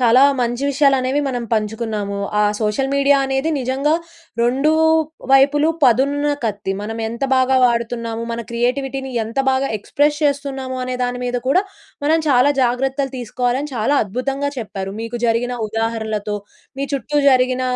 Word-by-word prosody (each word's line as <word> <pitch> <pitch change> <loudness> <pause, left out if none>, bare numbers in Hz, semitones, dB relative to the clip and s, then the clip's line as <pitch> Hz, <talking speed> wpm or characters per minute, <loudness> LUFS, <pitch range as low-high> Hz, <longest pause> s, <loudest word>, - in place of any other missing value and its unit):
చాలా 245 +1 +5 0.2
మంచి 240 +2 -1
విషయాలనేవి 275 0 +2
మనం 245 -3 -2
పంచుకున్నాము. 215 -2 -2 0.2
ఆ - - +4 0.2
సోషల్ 220 +5 0
మీడియా 280 0 +4
అనేది 270 +4 -1
నిజంగా 265 +4 0 0.5
2 265 +6 +2 0.6
వైపులు 290 +3 +5 0.2
పదునున్న 280 +4 +3
కత్తి. 205 -2 -2
మనమెంత 225 +3 -4
బాగా 260 0 +3
వాడుతున్నాము, 235 -1 -1
మన 235 - -3
క్రియేటివిటీని 265 +3 -2
ఎంత 230 +4 -6
బాగా 265 +1 +1
ఎక్స్‌ప్రెస్ 295 +7 0
చేస్తున్నాము 270 -2 -2
అనే 255 0 -3
దాని 245 0 -3
మీద 245 0 -1
కూడా 365 +8 +4 0.4
మనం 320 +2 +3
చాలా 265 +2 +4
జాగ్రత్తలు 265 +2 0
తీసుకోవాలని 250 +4 -2
చాలా 240 +6 +1
అద్భుతంగా 270 +7 -2
చెప్పారు, 195 -3 -5
మీకు 230 +1 -5
జరిగిన 235 +2 0 0.2
ఉదాహరణలతో, 220 -2 -2 0.4
మీ 280 - -1
చుట్టూ 295 +2 -1
జరిగిన 255 0 +2
255 Hz, 135 wpm, -19 LUFS, 230-275 Hz, 0.6 s, చాలా